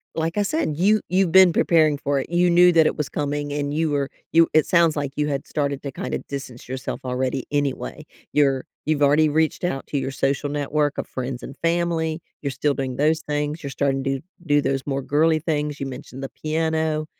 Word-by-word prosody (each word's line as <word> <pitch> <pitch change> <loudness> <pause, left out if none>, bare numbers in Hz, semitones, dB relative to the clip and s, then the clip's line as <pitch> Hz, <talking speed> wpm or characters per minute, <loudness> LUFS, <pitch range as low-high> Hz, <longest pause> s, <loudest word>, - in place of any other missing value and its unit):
like 165 +3 -2
I 205 - +3
said, 200 - -1
you 205 +4 +3
you've 185 -2 +2
been 190 -2 +7
preparing 155 -3 +3
for 140 0 0
it, - - -5
you 175 +1 +3
knew 175 +1 +6
that 160 -2 +5
it - - +1
was 150 -2 -2
coming, 145 0 -2
and 145 0 -2
you 160 0 +1
were, 140 -1 0 0.2
you 165 0 +5
it 155 - +5
sounds 170 -3 +3
like 145 -2 -2
you 150 - +1
had 140 -2 -2
started 140 -2 -2
to 140 - -4
kinda - - -4
distance 135 -4 -7
yourself 130 0 -4
already 130 +1 -1
anyway, 145 +1 -2 0.3
you're 135 -3 +2 0.2
you've 150 -1 +1
already 150 +2 +4
reached 160 +3 0
out 135 -7 -2
to 145 - -2
your 135 - -3
social 135 +2 -1
network 145 0 -1
of - - -2
friends 130 -1 -5
and 135 - -8
family, 165 -1 0 0.2
you're 140 - -2
still 140 +3 0
doing 130 -2 -3
those 155 +3 +2
things, 150 +1 -2
you're 140 - -5
starting 135 0 0
to 135 0 -1 0.3
do 145 0 +4
those 135 -1 0
more 135 -1 -1
girly 155 +4 +3
things, 150 -2 -2
you 135 - -3
mentioned 130 0 -8
the 135 - -4
piano, 160 0 -1
150 Hz, 215 wpm, -23 LUFS, 140-160 Hz, 0.3 s, been